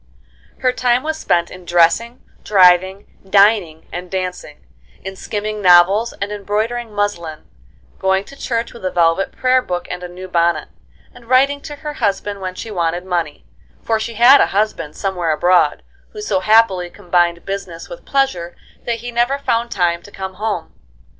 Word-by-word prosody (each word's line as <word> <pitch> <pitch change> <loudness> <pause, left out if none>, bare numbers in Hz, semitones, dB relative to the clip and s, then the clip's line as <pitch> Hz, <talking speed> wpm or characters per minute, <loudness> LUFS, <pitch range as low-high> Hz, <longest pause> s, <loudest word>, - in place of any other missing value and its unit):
Her 255 - +3
time 250 0 +1
was 315 0 -3
spent 170 - 0
in 185 - -11
dressing, 175 +8 +2 0.2
driving, 190 0 +4 0.2
dining 195 -5 +3
and 180 0 -6
dancing; 180 - -5 0.4
in 190 +1 -6
skimming 210 +2 -4
novels, 190 +5 +5
and 200 +1 -5
embroidering 215 +3 -2
muslin; 205 -7 -3 0.5
going 190 0 +1
to 275 - -14
church 235 -3 -3
with 235 - -13
a 185 - 0
velvet 170 +2 +1
prayer 255 0 +2
book 180 -7 -4
and 180 0 -5
a 180 - -6
new 180 +1 -9
bonnet; 170 -1 0 0.4
and 240 -1 -17
writing 275 +3 +3
to 295 - -8
her 300 +1 -6
husband 205 -4 -2
when 185 -1 -5
she 220 - -7
wanted 175 -1 -2
money, 170 -5 -3 0.4
for 225 -1 0
she 230 +1 -5
had 250 +5 +7
a - - +3
husband 205 -8 -1
somewhere 185 -4 -2
abroad, 180 +3 +2 0.3
who 425 - -7
so 190 - 0
happily 195 -3 +3
combined 175 -1 0
business 195 -4 -6
with - - -10
pleasure 225 -12 -1 0.3
that 230 -2 -2
he 240 0 -6
never 240 +4 +1
found 235 -4 -1
time 175 -5 0
to 205 - -14
come 190 -1 -7
home. 205 -3 -4
195 Hz, 165 wpm, -18 LUFS, 175-235 Hz, 0.5 s, had